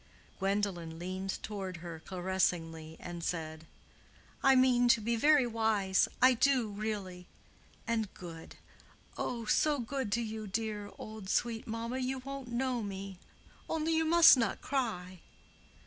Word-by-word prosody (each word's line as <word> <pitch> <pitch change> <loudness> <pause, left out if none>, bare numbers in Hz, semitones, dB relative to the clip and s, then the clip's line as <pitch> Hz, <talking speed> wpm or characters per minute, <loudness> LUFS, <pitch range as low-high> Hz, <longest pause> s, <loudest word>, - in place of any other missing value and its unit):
Gwendolen 195 -4 -1
leaned 185 +2 -4
toward 195 -4 -5
her 165 -1 -8
caressingly 175 -4 -1
and 175 -1 -7
said, 160 -2 -4 0.7
"I 270 0 +6
mean 255 -1 +4
to 235 - +5
be 235 +2 0
very 290 +2 +5
wise; 220 -5 +2 0.2
I 255 0 +8
do, 255 -2 +2
really. 200 -4 -5 0.6
And 225 -4 -1
good—oh, 180 +7 -8
so 295 +6 +3
good 255 -2 -3
to 235 - +1
you, 220 -1 -5
dear, 210 0 -3
old, 215 -3 -8
sweet 230 0 0
mamma, 230 +3 -3
you 260 +1 -1
won't 275 0 -7
know 245 0 -1
me. 195 -2 -6 0.5
Only 320 0 0
you 320 0 +2
must 335 -1 +8
not 230 -5 0
cry." 185 -9 -3
215 Hz, 130 wpm, -32 LUFS, 185-245 Hz, 0.7 s, I